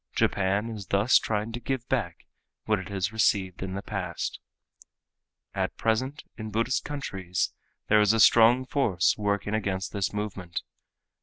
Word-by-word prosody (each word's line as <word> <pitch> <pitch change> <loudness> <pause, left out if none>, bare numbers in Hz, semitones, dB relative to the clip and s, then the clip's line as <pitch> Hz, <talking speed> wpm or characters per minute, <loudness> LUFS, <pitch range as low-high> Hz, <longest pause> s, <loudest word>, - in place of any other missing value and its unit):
Japan 100 +3 +1
is 105 -3 -7
thus 100 +5 +4
trying 105 +1 -2
to 120 - -5
give 125 0 -3
back 105 -11 -2 0.4
what 110 -2 +2
it 95 - -8
has 100 +1 -2
received 100 -5 +1
in 95 0 -4
the 100 - -4
past. 90 -5 -4 1.1
At - - -2
present 130 +6 0 0.2
in 110 0 -5
Buddhist 115 +5 0
countries 95 -11 -3 0.3
there 105 0 +5
is 105 0 +5
a 115 - +1
strong 120 +4 +6
force 110 -10 +2
working 100 0 -1
against 95 -3 -2
this 100 -2 -1
movement. 100 -4 -4
105 Hz, 150 wpm, -27 LUFS, 95-115 Hz, 1.1 s, strong